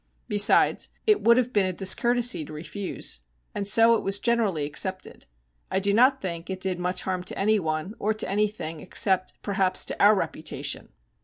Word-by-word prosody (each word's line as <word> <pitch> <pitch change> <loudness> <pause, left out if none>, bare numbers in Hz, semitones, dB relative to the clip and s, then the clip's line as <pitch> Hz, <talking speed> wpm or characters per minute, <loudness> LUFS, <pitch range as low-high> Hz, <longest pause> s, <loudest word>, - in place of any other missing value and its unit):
Besides, 205 +1 +3 0.2
it 425 -2 +3
would 235 +1 +4
have 250 0 0
been 200 -3 +2
a - - -1
discourtesy 235 +3 +2
to 155 - -12
refuse. 160 - -5 0.3
And 200 -1 -3
so 225 +3 +6
it - - -2
was 195 +1 +2
generally 210 -9 0
accepted. 185 +6 -3 0.4
I - - 0
do 200 +1 0
not 260 +5 +4
think 170 -1 -5
it 190 -1 -4
did 185 -2 -2
much 180 +1 -2
harm 185 -1 -3
to - - -4
anyone, 190 -4 -1
or 215 - 0
to 215 - -2
anything, 200 -5 -2
except, 185 +2 0
perhaps, 195 -2 +1
to - - -3
our 210 +1 +6
reputation. 190 - -4
195 Hz, 175 wpm, -25 LUFS, 185-215 Hz, 0.4 s, so